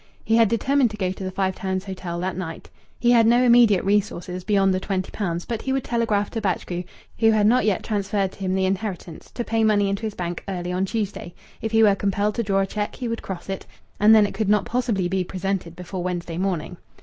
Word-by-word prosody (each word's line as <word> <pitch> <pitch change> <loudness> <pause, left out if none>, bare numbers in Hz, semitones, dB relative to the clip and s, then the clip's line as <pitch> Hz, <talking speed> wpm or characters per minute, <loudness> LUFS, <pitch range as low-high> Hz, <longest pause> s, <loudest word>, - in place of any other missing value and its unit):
He 225 - +2
had 225 -3 +5
determined 260 +3 +2
to 215 - -8
go 185 -2 -1
to 190 - -7
the 185 - -2
Five 190 0 -1
Towns 190 0 -3
Hotel 185 -3 -5
that 185 0 -2
night. 165 -3 -7 0.3
He 240 - +3
had 230 -2 +5
no 240 +2 +5
immediate 235 -6 +5
resources 190 -3 -1
beyond 195 -1 +3
the 185 - 0
twenty 190 -1 -3
pounds, 175 -4 -3
but 230 -2 -3
he 265 - -3
would 265 -1 0
telegraph 220 -4 0
to 225 - -3
Batchgrew, 180 -2 -2 0.3
who 225 -1 +5
ad 210 -1 +3
not 245 +3 +4
yet 210 -3 +1
transferred 200 -2 -1
to - - -18
him 190 -1 -1
the 190 0 +1
inheritance, 190 -3 -4
to 240 - -4
pay 225 -1 0
money 205 -2 +3
into 195 0 -2
his 220 -2 -4
bank 175 -1 -4
early 180 -2 -3
on 185 +1 0
Tuesday; 200 -4 -4 0.3
if 220 - -3
he 225 0 +5
were 205 -2 +6
compelled 200 +1 0
to 235 - -1
draw 195 -3 +1
a - - +1
cheque 210 +1 -4
he 250 - -4
would 230 0 -3
cross 190 -3 -7
it, 195 -1 -5 0.3
and 215 +2 +7
then 215 -1 +6
it 200 - -4
could 215 -3 -1
not 210 -1 +3
possibly 230 -7 0
be 185 +1 0
presented 185 -2 -3
before 180 +1 -6
Wednesday 175 -1 -3
morning. 180 -2 -2
195 Hz, 240 wpm, -23 LUFS, 185-220 Hz, 0.3 s, and